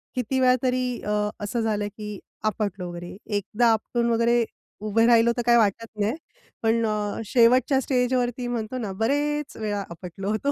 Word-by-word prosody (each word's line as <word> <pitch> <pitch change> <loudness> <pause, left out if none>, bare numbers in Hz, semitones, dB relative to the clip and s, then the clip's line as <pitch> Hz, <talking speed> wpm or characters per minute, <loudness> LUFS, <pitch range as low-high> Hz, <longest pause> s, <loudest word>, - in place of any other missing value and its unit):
किती 255 +2 -1
वेळा 255 -1 +5
तरी 255 0 +1 0.2
अ, 210 0 0
असं 230 +3 -1
झालं 210 -2 0
की 210 -2 -6 0.2
आपटलो 200 -4 -2
वगैरे. 175 +1 -8
1दा 210 +3 0
आपटून 235 +2 0
वगैरे 235 +1 +3 0.4
उभे 225 +2 +3
राहिलो 235 0 +5
तर 240 - +1
काय 240 0 +6
वाटत 225 +1 +2
नाही. 210 +5 +1 0.5
पण 225 +1 +2
अ, 210 0 -2
शेवटच्या 255 +4 +4
स्टेजवरती 250 -1 0
म्हणतो 240 0 -3
ना 215 -5 -3
बरेच 295 +3 0
वेळा 205 -2 -2
आपटलो 180 +3 -6
होतो. 250 +7 0
230 Hz, 160 wpm, -25 LUFS, 210-245 Hz, 0.5 s, काय